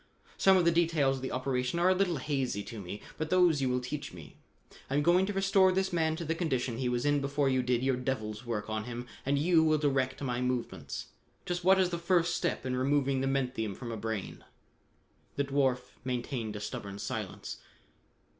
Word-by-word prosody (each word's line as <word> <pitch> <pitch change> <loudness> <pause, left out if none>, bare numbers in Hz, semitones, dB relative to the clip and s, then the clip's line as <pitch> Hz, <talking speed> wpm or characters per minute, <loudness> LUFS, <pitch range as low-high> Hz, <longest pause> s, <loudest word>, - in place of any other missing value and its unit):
Some 190 -1 +5
of 180 - +3
the 170 - +5
details 160 -5 +2
of - - -8
the 130 - -4
operation 130 +2 -1
are 175 +2 +4
a - - +6
little 185 -3 +1
hazy 130 -6 -1
to 110 -1 -7
me, 100 +3 -7 0.2
but 155 0 -2
those 175 -5 +4
you 130 - +1
will 125 0 +1
teach 125 0 -5
me. 80 -4 -11 0.5
I 135 - -1
am 145 - +2
going 180 +4 +4
to 205 - -2
restore 195 -1 +4
this 190 0 0
man 160 -2 +1
to 170 - -5
the 160 - 0
condition 130 -8 -1
he 125 -2 0
was 120 +1 -1
in 145 -1 +3
before 140 0 +1
you 130 -1 +2
did 125 0 0
your 135 -1 +2
devil's 115 -4 -3
work 115 -4 -3
on 110 0 -3
him 120 0 -5 0.2
and 140 +1 +2
you 165 +2 +4
will 155 -1 +3
direct 135 -3 0
my 125 -2 -1
movements. 125 -1 -3 0.4
Just 175 0 -2
what 190 +2 +6
is 185 -1 +2
the 170 - -2
first 170 -1 +2
step - - -1
in 130 -1 -1
removing 135 0 +1
the 135 - 0
menthium 125 -6 -1
from 120 +2 -6
a - - -3
brain?" 110 -2 -4 0.9
The 140 - +1
dwarf 135 -3 0
maintained 120 -3 -3
a - - -4
stubborn 100 -1 -6
silence. - - -5
135 Hz, 210 wpm, -31 LUFS, 125-165 Hz, 0.9 s, a